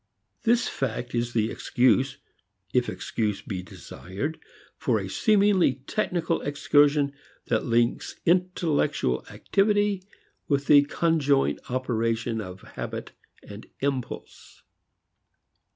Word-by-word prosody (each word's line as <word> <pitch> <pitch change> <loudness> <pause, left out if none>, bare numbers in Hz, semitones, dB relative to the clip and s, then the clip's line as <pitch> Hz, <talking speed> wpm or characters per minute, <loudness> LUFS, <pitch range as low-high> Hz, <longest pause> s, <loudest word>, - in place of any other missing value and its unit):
This 235 +1 +3
fact 125 -1 -3
is 120 0 -1
the 110 -1 +1
excuse, 120 -4 +2 0.6
if - - +2
excuse 105 -3 -2
be 95 -4 -4
desired, 95 - -6 0.4
for - - 0
a - - -4
seemingly 200 - +3
technical 175 -4 -1
excursion 145 0 +3 0.4
that - - +1
links 120 -1 0
intellectual 170 - +1
activity 205 -1 +1 0.5
with 140 -1 +1
the 145 -1 +7
conjoint 145 -3 +2
operation 115 -2 -1
of 95 -2 -8
habit - - -5 0.3
and 105 +1 -11
impulse. 135 -3 -4
140 Hz, 100 wpm, -26 LUFS, 115-165 Hz, 0.6 s, the